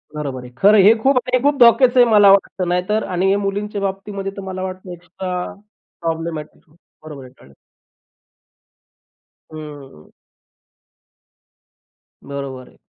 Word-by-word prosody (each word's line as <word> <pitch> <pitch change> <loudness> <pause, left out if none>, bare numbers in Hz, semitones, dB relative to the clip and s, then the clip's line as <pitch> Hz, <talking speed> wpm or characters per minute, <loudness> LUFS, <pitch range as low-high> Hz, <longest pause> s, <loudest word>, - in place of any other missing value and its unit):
बरोबर 135 -4 -5
आहे. 125 - -12
खरं 205 +7 +5
आहे 195 - +6
हे 210 +4 +7
खूप 270 -1 +3 0.2
हे 255 - +4
खूप 290 0 +2
धोक्याचं 245 +1 +5
आहे 245 -1 +5
मला 205 -2 +6
वाटतं, 190 -2 +1
नाहीतर 180 +5 -1
आणि 190 +2 0
मुलींच्या 205 +1 -3
बाबतीमध्ये 195 0 -4
तर - - -5
मला 185 0 -5
वाटतं 185 0 -7
एक्स्ट्रा 180 +1 -6 0.6
प्रॉब्लेमॅटिक 165 -2 -5 0.3
बरोबर 145 -4 -10
आहे, 125 - -15
कळलं. 70 - -19 2.0
हम्म. 145 - -12 2.1
बरोबर 135 -2 -8
आहे - - -22
185 Hz, 125 wpm, -19 LUFS, 150-205 Hz, 2.1 s, हे